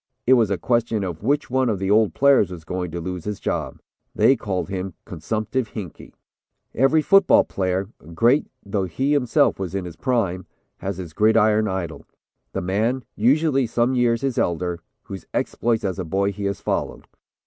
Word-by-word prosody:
It 130 - +5
was 115 -5 +4
a 100 - 0
question 115 -2 0
of 85 -4 -5
which 140 +4 0
one 130 -1 +2
of 105 - 0
the 95 +1 -1
old 110 0 +3
players 140 -8 +4
was 90 -3 -9
going 90 +2 -4
to 85 +2 -5
lose 90 0 -5
his 105 -1 -4
job. - - -3 0.4
They 135 - +5
called 95 -7 -3
him 95 -2 -5
'consumptive 110 +7 -3
Hinkey.'" 95 -8 -8 0.6
Every 135 +5 +3
football 195 +1 +5
player, 95 0 -2 0.3
great 120 - +3 0.2
though 100 -1 -1
he 130 - -1
himself 125 -8 +2
was 95 -1 -4
in 95 -2 -2
his 85 -2 -8
prime, 100 - -1 0.3
has 95 -1 -4
his 85 -4 -7
gridiron 110 +1 +3
idol. 95 -4 -4 0.5
The - - -2
man, 110 +8 0
usually 135 +2 +2
some 120 +2 +1
years 120 -2 +2
his 135 -3 0
elder, 85 0 -1 0.2
whose 95 -2 -9
exploits 115 -2 0
as 95 0 -2
a - - -1
boy 95 +4 0
he 100 +1 -6
has 100 0 -2
followed. - - -3
105 Hz, 180 wpm, -22 LUFS, 95-120 Hz, 0.6 s, It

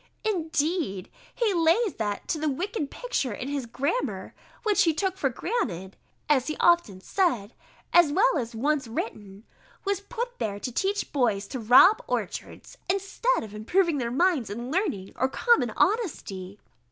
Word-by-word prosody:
Indeed 320 - -1 0.2
he 460 -5 +1
lays 345 +5 +3
that 205 -2 -3
to 315 - 0
the 310 0 0
wicked 330 - -3
picture - - -2
in 250 +6 -5
his 280 -4 -3
grammar, 285 - -2 0.3
which 425 -3 +3
he 325 -3 +3
took 380 +1 0
for 285 -8 0
granted 230 - -3 0.3
(as 265 -4 +3
he 310 - -2
has - - -5
often 345 - +3
said, 245 - 0 0.4
as 345 -4 +6
well 385 0 +3
as 235 -2 -5
once 280 +2 0
written) 210 -3 -6 0.4
was 400 -1 0
put 485 +3 -5
there 200 -1 -2
to 250 - -4
teach 395 - -1
boys 225 -8 +1
to 260 - -4
rob 255 - +6
orchards, - - -5
instead 395 - 0
of 215 -2 -9
improving 315 - +1
their 235 -2 -1
minds 285 - +1
in 240 +5 -5
learning, 305 - -1
or 260 - +1
common 475 - +3
honesty. 205 - -1
300 Hz, 160 wpm, -26 LUFS, -, 0.4 s, as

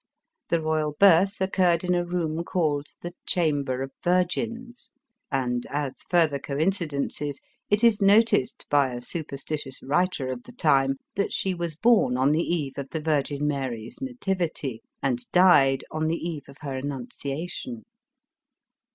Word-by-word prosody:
The 170 - +2
royal 155 -1 0
birth 195 +3 +5
<K 190 - +1
eurre»l 185 -3 +3
in 180 - +3
a 175 0 +1
room 170 -2 -2
called 150 -5 0
the 175 0 -6
Chamber 145 -7 0
of 135 - -6
Virgins; 230 +7 -1 0.4
and, 125 -3 -1
as 145 -2 -3
further 160 -5 +3
coincidences, 145 -2 -2 0.3
it 205 +2 +2
is 225 -3 +5
noticed 205 - +3
by 140 -2 +4
a 120 - -4
supersti 145 +2 -5
tious 135 -1 -8
writer 145 -2 0
of 125 -1 -5
the 245 - -14
time, 135 - +3 0.2
that 200 - 0
she 190 - 0
was 170 -3 -3
born 215 - +3
on 130 +3 +3
the 155 +2 +2
eve 150 -6 -2
of 135 -1 -6
tin 160 -2 -4
Virgin 150 -1 0
Mark's 130 - -4
nativity, 185 - -2 0.2
and 125 -3 -1
died 145 -8 +5
on 155 0 -1
the 165 +1 0
eve 160 -5 -5
of 140 - -13
her 140 -3 -4
Annunciation. 145 - -5
155 Hz, 150 wpm, -26 LUFS, 140-180 Hz, 0.4 s, birth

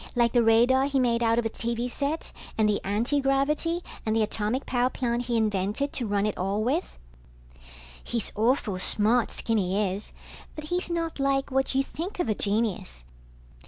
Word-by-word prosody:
Like 235 -1 +3
the 240 - +5
radar 240 +4 +4
he 275 -1 +1
made 240 -2 +2
out 230 0 +3
of 235 - +1
a - - +1
TV 235 +1 -2
set 285 +5 -3 0.3
and 220 -1 +3
the 210 -1 +1
antigravity 275 - +1 0.2
and 220 0 0
the 225 - +3
atomic 215 +4 -1
power 250 0 +1
plant 245 -2 -2
he 235 -1 0
invented 215 +5 0
to 240 - -2
run 205 0 +1
it 210 - -2
all 195 +3 0
with. 285 +10 -1 1.1
He's 235 -3 -2
awful 220 -4 +1
smart, 220 +5 +2
Skinny 200 -3 0
is, 200 +2 -7 0.4
but 305 -1 -7
he's 355 0 -1
not 330 -3 -2
like 275 0 +1
what 265 0 +1
you 270 - +3
think 340 +8 -6
of 350 - 0
a - - +3
genius. 200 - -1
235 Hz, 175 wpm, -27 LUFS, 215-275 Hz, 1.1 s, the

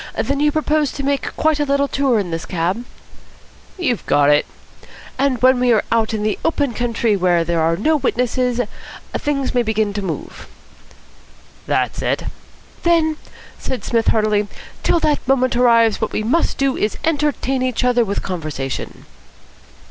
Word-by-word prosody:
Then 280 0 -1
you 295 0 +3
propose 305 -2 +1
to 280 - -5
make 280 0 -1
quite 310 -1 +2
a - - +2
little 280 0 +1
tour 275 -4 +1
in 190 -5 -2
this 165 0 -4
cab?" 185 +7 -2 0.9
"You've 280 - -1
got 145 0 +4
it." 145 - +3 0.7
"And 270 -3 +1
when 255 0 +5
we 250 -1 +3
are 215 - +2
out 225 -1 +2
in 215 -2 -2
the 215 -1 -1
open 290 -6 0
country, 230 -2 0
where 175 -3 +2
there 170 0 -1
are 165 +1 +2
no 310 - +2
witnesses, 250 -2 0 0.6
things 280 -2 -1
may 245 - +3
begin 220 -2 0
to 205 - -3
move." 185 -4 -6 1.2
"That's - - 0
it." - - -1 0.6
"Then," 325 -2 +2 0.4
said 260 - -4
Psmith 230 -1 0
heartily, 215 -1 +2 0.3
"till 340 - +2
that 300 -2 +2
moment 255 -2 +2
arrives 230 -3 +4
what 220 - -2
we 215 - -1
must 270 +10 +1
do 275 -1 +1
is 210 - 0
to - - -6
entertain 290 -4 0
each 255 -1 -1
other 245 -1 +3
with 200 -2 -3
conversation. 155 -7 -5
245 Hz, 165 wpm, -19 LUFS, 210-280 Hz, 1.2 s, when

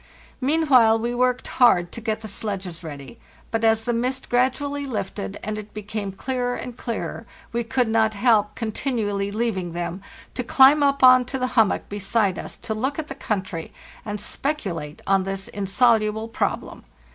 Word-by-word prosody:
Meanwhile 260 -6 +4
we 235 +2 -2
worked 250 0 +1
hard 180 -9 +4
to 230 - -7
get 220 -1 -2
the 220 - -7
sledges 190 -4 -5
ready; 145 - -9 0.3
but 225 0 -1
as 225 0 +3
the 240 - 0
mist 255 +3 -2
gradually 275 +3 0
lifted 190 - -4
and 215 0 -3
it 210 0 -11
became 210 -1 -4
clearer 245 +4 -2
and 245 - -6
clearer, 230 -2 -5 0.3
we 235 0 0
could 250 +1 +1
not 220 -1 +2
help 210 -2 +3
continu 225 0 -2
ally 200 0 -1
leaving 200 -5 -2
them, 175 +2 -4 0.3
to 250 - -3
climb 270 +4 +6
up 280 -1 +2
on 255 0 +8
to 265 +2 -4
the 255 - 0
hummock 225 -5 +2
be 205 - -5
side 200 -2 +1
us - - -7
to 220 - -4
look 260 +6 -2
at 315 -1 -4
the - - -4
country, 190 - -4 0.3
and 210 0 -4
speculate 195 - -4
on_ 195 -1 +3
this 195 0 -4
insoluble 215 +1 +2
problem. 225 - -3
225 Hz, 175 wpm, -23 LUFS, 200-250 Hz, 0.3 s, on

